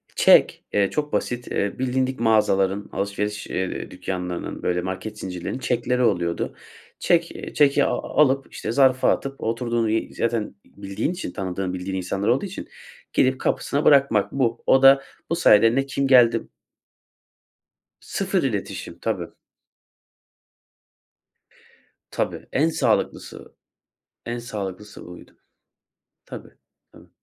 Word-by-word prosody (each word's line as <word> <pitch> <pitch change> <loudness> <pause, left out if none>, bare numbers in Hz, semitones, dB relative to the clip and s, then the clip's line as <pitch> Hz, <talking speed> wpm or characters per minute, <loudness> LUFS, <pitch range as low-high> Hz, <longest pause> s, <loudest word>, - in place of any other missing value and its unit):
Çek, - - +5
eee, 100 -1 +2
çok 150 -1 -3
basit. 120 0 -2
Eee, 100 +3 -2
bilindik 130 0 -1
mağazaların, 100 -3 +2
alışveriş, 100 +1 -3
eee, 95 0 -4
dükkânlarının, 90 -2 -5
böyle, 90 0 0
market 95 +4 -6
zincirlerinin 90 +6 -5
çekleri 125 0 0
oluyordu. 85 -7 0 0.4
Çek, 170 -1 +2
eee, - - -8
çeki, 145 -1 +4
aaa, - - -1 0.2
alıp, 135 -2 +2
işte, 110 - -4
zarfa 130 0 +4
atıp, 135 0 -4
oturduğun 115 0 -1
y 110 +1 -1
zaten 115 -3 -2
bildiğin 100 - -4
için, 180 - -5
tanıdığın, 95 -1 -4
bildiğin 95 +1 -4
insanlar 95 +3 -3
olduğu 125 - +2
için, 195 0 -7 0.5
gidip 130 0 +2
kapısına 145 +2 -1
bırakmak, 135 -8 +4
bu. 120 -4 -1
O 135 - +4
da 135 0 +7 0.3
bu 170 - +1
sayede, 115 -7 +5
ne 135 - +1
kim 140 0 -1
geldi 120 -3 +5 1.5
Sıfır - - -2
iletişim, - - -4
tabii. - - -2 2.8
Tabii, - - -3
en 155 +4 +2
sağlıklısı, - - -2 0.7
en 120 +1 -3
sağlıklısı 105 -3 -7
buydu. 90 0 -12 0.9
Tabii, - - -9 0.4
tabii. - - -18
115 Hz, 120 wpm, -23 LUFS, 100-135 Hz, 2.8 s, da